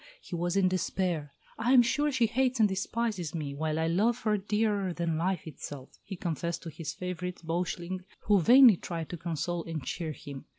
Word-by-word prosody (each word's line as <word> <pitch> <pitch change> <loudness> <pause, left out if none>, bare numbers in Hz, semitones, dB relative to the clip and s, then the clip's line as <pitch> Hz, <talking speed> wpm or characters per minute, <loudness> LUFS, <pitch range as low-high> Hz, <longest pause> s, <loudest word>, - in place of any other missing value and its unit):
He 180 - -7
was 175 +2 -1
in 190 -1 +4
despair. 180 -4 -1 0.3
"I 240 +3 +2
am 250 -2 +8
sure 290 +5 +1
she 255 -3 +3
hates 255 +2 +1
and 215 - +6
despises 195 -3 -2
me, 145 -3 -3
while 155 +2 -2
I 160 - +1
love 210 +9 +2
her 215 -1 +2
dearer 205 -2 0
than 170 -1 -1
life 180 +2 -1
itself," 145 -3 -8
he 195 - -7
confessed 170 -1 -3
to 165 - -6
his 155 -1 -5
favourite 180 -1 -5
Beuchling, 175 +2 -2 0.2
who 205 -3 +3
vainly 245 0 +8
tried 165 -2 -5
to 175 - -5
console 170 +1 -3
and 165 -4 -4
cheer 160 -3 -3
him. 140 -2 -9
180 Hz, 195 wpm, -30 LUFS, 165-210 Hz, 0.3 s, am